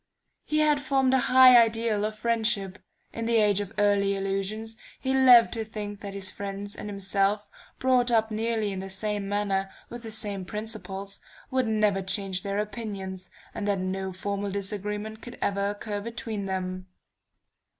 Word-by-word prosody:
He 305 0 +1
had 300 -2 +3
formed 270 -2 +2
a 265 - +5
high 255 0 +9
ideal 225 -2 +3
of 215 0 -3
friendship; 215 -4 0 0.3
in 230 0 -3
the 235 - +2
age 210 -3 +4
of 200 -1 -6
early 200 -1 +3
illusions 195 +3 -2 0.2
he 265 0 -1
loved 255 -3 +7
to 225 -2 -2
think 210 -2 -6
that 200 -1 -7
his 190 -1 -3
friends 200 0 -5
and 210 - -6
himself, 200 +1 0 0.3
brought 255 -1 +3
up 220 -2 +2
nearly 220 -1 -1
in 190 - -4
the 195 0 -6
same 205 0 -3
manner, 200 -1 0 0.2
with 240 0 -7
the 225 - -7
same 205 -3 -4
principles, 200 -1 -6 0.3
would 260 -2 +1
never 210 -3 +2
change 190 -1 -1
their 200 +1 -3
opinions, 195 -3 -4 0.2
and 205 - -4
that 200 -1 +2
no 190 +1 -3
formal 200 +2 -3
disagreement 210 +2 -4
could 240 - -9
ever 200 0 0
occur 205 0 -4
between 220 -2 -4
them.... 185 -1 -3
205 Hz, 165 wpm, -27 LUFS, 195-225 Hz, 0.3 s, high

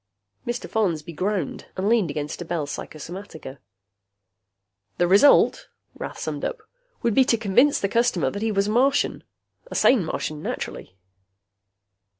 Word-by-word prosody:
Mr. 240 0 -3
Follansby 170 -7 -1
groaned 185 -1 -2
and 190 +2 -1
leaned 220 -6 +3
against 150 +3 -4
a - - -5
Bell 165 -3 -2
Psychosomatica. 155 -1 -8 1.4
"The 175 - +2
result," 200 +10 +5 0.3
Rath - - -7
summed - - -4
up, - - -4 0.4
"would 235 -2 +2
be 265 - +6
to 240 -3 +2
convince 235 +7 +3
the 195 - 0
customer 195 - +1
that 200 - -5
he 225 0 0
was 200 0 +1
a - - 0
Martian. 270 +5 +2 0.5
A - - -7
sane 245 -7 +4
Martian, 155 -1 -4
naturally." 90 - -5
195 Hz, 145 wpm, -24 LUFS, 160-235 Hz, 1.4 s, be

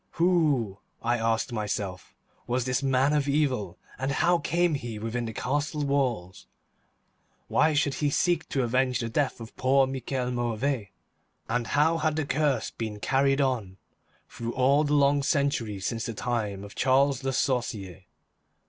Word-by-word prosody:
Who, 150 - +2 0.2
I 120 +1 +1
asked 115 +1 0
myself, 100 -4 -4 0.3
was 125 0 0
this 125 +1 0
man 135 +1 +2
of 145 -1 +1
evil, 130 - 0 0.2
and 135 +1 -1
how 175 +5 +3
came 170 +2 +1
he 120 -6 -4
within 115 +3 -3
the 110 - -4
castle 145 +5 -2
walls? 120 - -1 1.0
Why 155 -1 +3
should 145 -1 +2
he 145 +1 0
seek 175 +4 +1
to 135 - 0
avenge 125 +1 +1
the 115 - -3
death 140 +3 0
of 115 0 -10
poor 135 +1 +4
Michel 130 -1 -3
Mauvais, 120 -1 -1 0.6
and 120 0 -1
how 160 +3 +3
had 155 -1 +1
the 155 -1 -1
curse 145 -1 0
been 110 -2 -5
carried 135 +4 +2
on 115 -9 -1 0.5
through 115 0 -6
all 135 +3 +4
the 150 0 +1
long 140 0 +4
centuries 135 - 0
since 115 -1 -2
the 115 - -5
time 105 -5 -2
of 100 - -10
Charles 135 +1 +2
Le 135 - 0
Sorcier? 105 -9 -2
130 Hz, 155 wpm, -27 LUFS, 115-140 Hz, 1.0 s, poor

